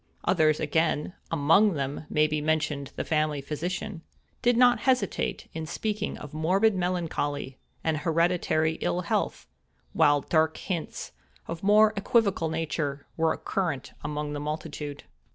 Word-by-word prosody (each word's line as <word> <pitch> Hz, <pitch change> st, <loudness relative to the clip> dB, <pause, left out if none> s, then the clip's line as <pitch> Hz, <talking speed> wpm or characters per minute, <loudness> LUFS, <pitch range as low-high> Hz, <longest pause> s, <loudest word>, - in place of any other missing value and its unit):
Others 155 Hz, -1 st, +3 dB
again 160 Hz, +1 st, 0 dB, 0.2 s
(among 195 Hz, +8 st, +4 dB
them 140 Hz, +1 st, -4 dB
may 150 Hz, 0 st, +3 dB
be 150 Hz, 0 st, -1 dB
mentioned 150 Hz, -2 st, -1 dB
the -, -, -3 dB
family 155 Hz, -2 st, +1 dB
physician) 170 Hz, +6 st, -4 dB, 0.4 s
did 245 Hz, -1 st, +3 dB
not 245 Hz, -2 st, +6 dB
hesitate 255 Hz, +2 st, 0 dB
in 160 Hz, -1 st, -5 dB
speaking 210 Hz, +4 st, -2 dB
of 150 Hz, -1 st, -10 dB
morbid 190 Hz, +8 st, +3 dB
melancholy, 165 Hz, -7 st, -2 dB, 0.2 s
and 160 Hz, -1 st, +1 dB
hereditary 160 Hz, 0 st, +1 dB
ill 180 Hz, -, 0 dB
health; 170 Hz, -, -1 dB, 0.5 s
while 145 Hz, 0 st, +4 dB
dark 160 Hz, +2 st, +1 dB
hints, 175 Hz, -5 st, -4 dB, 0.4 s
of 165 Hz, 0 st, -5 dB
a -, -, -6 dB
more 215 Hz, +1 st, +6 dB
equivocal 200 Hz, -5 st, +2 dB
nature, 155 Hz, -3 st, -2 dB
were 160 Hz, -1 st, +1 dB
current 165 Hz, -9 st, -2 dB
among 150 Hz, 0 st, -3 dB
the 145 Hz, -, -3 dB
multitude. 150 Hz, -1 st, -5 dB
160 Hz, 135 wpm, -27 LUFS, 150-180 Hz, 0.5 s, not